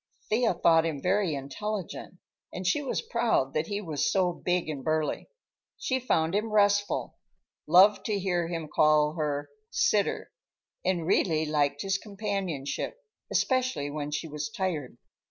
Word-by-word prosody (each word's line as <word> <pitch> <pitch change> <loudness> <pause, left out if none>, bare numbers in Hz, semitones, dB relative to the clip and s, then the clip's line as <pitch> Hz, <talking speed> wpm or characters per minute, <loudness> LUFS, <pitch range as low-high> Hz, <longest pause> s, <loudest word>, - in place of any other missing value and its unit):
Thea 225 -3 +2
thought 165 -1 +4
him 160 -3 -2
very 180 0 +1
intelligent, 185 +8 -5 0.4
and 185 - -6
she 240 +12 +2
was 275 - -2
proud 230 - +1
that 155 +1 -1
he 205 0 -3
was 160 -7 -1
so 185 -2 +2
big 180 -1 -1
and 145 -4 -4
burly. 155 -1 -1 0.5
She 260 0 -1
found 165 -9 +1
him 210 +2 0
restful, 205 -1 +1 0.5
loved 195 +5 +6
to 210 -2 0
hear 180 -3 0
him 165 -2 -4
call 150 0 +3
her 150 -3 -2 0.2
"sitter," 475 0 +1 0.5
and 175 -3 0
really 160 -3 +2
liked 145 -2 0
his 195 0 0
companionship, 200 - -3 0.3
especially 255 - 0
when 145 -1 -4
she 150 +2 -3
was 150 +4 -4
tired. 185 - -3
175 Hz, 145 wpm, -28 LUFS, 155-205 Hz, 0.5 s, loved